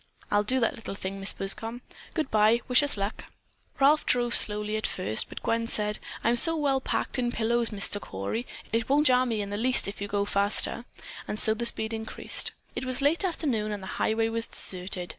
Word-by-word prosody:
"I'll 205 - +3
do 255 +5 +1
that 230 - 0
little 220 - -8
thing, 195 0 -6
Mrs. 195 - +1
Buscom. 225 +5 0 0.3
Good 310 -5 -2
bye. 215 +2 +3
Wish 250 +1 +5
us 290 -6 +1
luck!" 200 +2 -4 0.5
Ralph 290 +3 +4
drove 240 -1 +2
slowly 210 0 +4
at 215 - -2
first, 110 - -2
but - - -9
Gwen 230 0 -1
said, 210 -1 -1 0.2
"I'm 235 +1 +2
so 330 +6 +7
well 275 -3 0
packed 260 - -2
in 240 -1 -1
pillows, 235 0 0
Mr. 205 -1 0
Cory, 100 - -5 0.3
it 230 +1 -1
won't 290 +2 +3
jar 255 -1 +4
me 220 -3 -2
in 200 - -8
the 205 - -3
least 250 +1 +2
if 200 0 -8
you 200 - -3
go 200 0 -1
faster." 205 +4 0 0.4
And 210 - -4
so 220 - +3
the 235 +2 0
speed 220 -1 -1
increased. 220 0 -1 0.2
It - - -4
was 255 +1 +2
late 315 +7 +2
afternoon 260 - -2
and 205 -2 -6
the 190 - -6
highway 225 +1 +1
was 230 0 -1
deserted. 180 -1 +1
225 Hz, 210 wpm, -26 LUFS, 205-250 Hz, 0.5 s, so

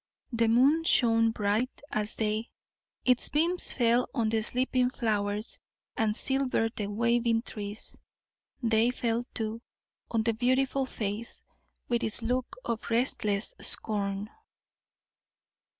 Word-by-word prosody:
The 230 0 +2
moon 270 +8 +4
shone 230 -7 +4
bright 220 +3 -1
as 215 0 0
day; 215 +1 -1 0.6
its 250 -1 +4
beams 335 +4 +4
fell 240 0 +2
on 230 -4 +1
the 220 0 +1
sleeping 250 +2 +1
flowers, 210 -3 -1 0.4
and 215 -1 +1
silvered 260 -4 0
the 205 - -3
waving 235 +2 +1
trees; 210 -1 -7 0.6
they 225 0 +3
fell, 235 -1 -1
too, 225 +1 -3 0.5
on 225 -1 0
the 230 0 +1
beautiful 260 +3 +1
face, 215 0 -5 0.4
with 240 0 0
its 220 +1 +1
look 250 +2 -2
of 230 -2 -3
restless 225 - 0
scorn. 205 -1 -1
230 Hz, 120 wpm, -29 LUFS, 215-250 Hz, 0.6 s, moon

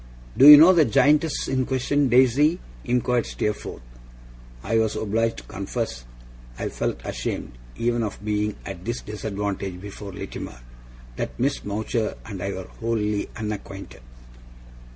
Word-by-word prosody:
'Do 140 - +7
you 150 0 +13
know 165 +5 +8
the 165 -3 +5
Giantess 145 +3 +2
in 130 -1 +1
question, 135 +2 +1
Daisy?' 130 +6 +4 0.3
inquired 125 -1 +1
Steerforth. 105 - -4 0.8
I 115 - +1
was 110 -1 0
obliged 115 +2 0
to - - -9
confess 60 0 -5 0.5
I - - -3
felt - - -3
ashamed, - - -4 0.3
even 120 0 0
of 105 -3 -3
being 105 0 -1
at 95 -2 -7
this 120 +3 -3
disadvantage 100 -3 -4
before 100 +1 -8
Littimer 60 -8 -7 0.6
that - - -4
Miss 135 +3 0
Mowcher 110 +2 -2
and 100 -5 -7
I 100 +1 -2
were 95 -1 -6
wholly 105 -3 -1
unacquainted. 105 - -6
110 Hz, 135 wpm, -24 LUFS, 100-130 Hz, 0.8 s, you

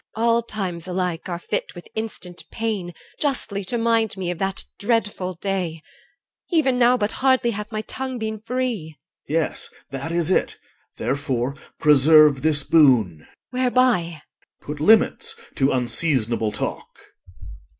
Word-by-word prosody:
EL. 225 - -1
All 235 0 +4
times 190 -7 -5
alike 180 -2 -2
are 175 - -2
fit 175 - -4
with 175 - -10
instant 180 -7 -6
pain 215 -6 -3
I - - -11 0.2
2 - - -22
Justly 245 -8 -1
to 240 - -1
mind 225 -3 +1
me 180 -2 -2
of 175 - -6
that 195 0 -2 0.2
dreadful 205 -4 -1
day; 175 -3 -3 0.7
Even 275 -8 +2
now 245 +1 +5
but 210 -2 0
hardly 260 -3 +2
hath 210 +1 -6
my 215 -1 -2
tongue 260 +1 -5
been 220 -1 -4
free. 225 -9 -3
OR. 140 - -18
Yes, 165 -1 0 0.2
that 140 +4 -4
is 170 +1 +1
it. - - +1 0.4
Therefore 135 -2 -1 0.3
preserve 150 -1 +6
this 150 -2 +3
boon. 125 - +4
EL. - - -21 0.2
Whereby? 250 - +1
OR. - - -34
Put 150 0 -5
limits 225 - +3 0.2
to 135 -1 +3
unseasonable 120 -3 +1
talk. - - -5
185 Hz, 150 wpm, -22 LUFS, 155-225 Hz, 0.7 s, preserve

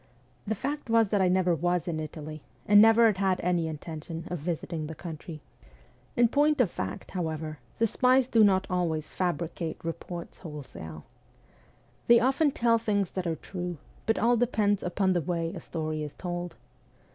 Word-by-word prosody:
The 220 - 0
fact 285 +4 -4
was 225 -2 +4
that 205 -1 +2
I 185 - +4
never 180 -1 +3
was 175 +2 0
in 160 -2 -2
Italy, 155 0 -7 0.2
and 205 0 +7
never 225 +1 +7
had 215 -4 +3
had 190 -1 +1
any 175 -2 +1
intention 160 +1 -6
of 175 - -2
visiting 160 0 -3
the 160 - -7
country. 160 -1 -8 0.4
\ 125 - -31
In 240 0 +6
point 295 +4 +2
of 220 -9 +3
fact, 95 +2 -5
however, 160 -4 -3 0.2
the 230 - +3
spies 255 +3 +3
do 225 -3 +5
not 190 -2 +4
always 165 -4 -1
fabricate 170 -2 -2
reports 170 +1 -6
wholesale. 130 - -9 1.0
They 235 0 +8
often 270 +5 +3
tell 235 -3 +2
things 205 -4 0
that 185 -2 -3
are 165 - 0
true, 175 +1 -5 0.3
but 225 - +2
all 240 +1 +3
depends 215 -4 +2
upon 190 +1 +1
the 175 - +1
way 165 +1 -2
a - - -7
story 155 -2 -3
is 150 -1 -6
told. 175 -1 -5
175 Hz, 175 wpm, -28 LUFS, 160-215 Hz, 1.0 s, They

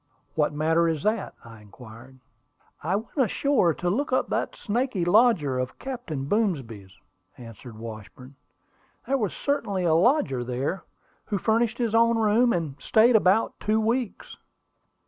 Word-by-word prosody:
"What 150 -1 +1
matter 160 +3 +1
is 160 -3 -2
that?" 215 0 -1
I 115 -2 -13
inquired. 115 +4 -14 0.6
"I 175 +5 -1
went 225 +7 -5
ashore 255 -5 +2
to 175 - -4
look 260 +12 -1
up 255 - +1
that - - -2
snaky 230 -4 -2
lodger 175 - +3
of 130 0 -4
Captain 235 - -5
Boomsby's," 130 - -2 0.4
answered 115 -1 -12
Washburn. 115 +4 -10 0.7
"There 275 0 0
was 210 -5 -1
certainly 205 -10 -2
a 165 -2 +2
lodger 165 - +2
there, 130 +9 -3 0.4
who 205 - -2
furnished 225 +3 +1
his 235 -3 -1
own 230 0 +4
room, 225 +2 +3
and 150 -7 -3
stayed 230 +2 +4
about 205 +1 +2
two 215 +1 +1
weeks." 230 +1 -2
185 Hz, 145 wpm, -25 LUFS, -, 0.7 s, own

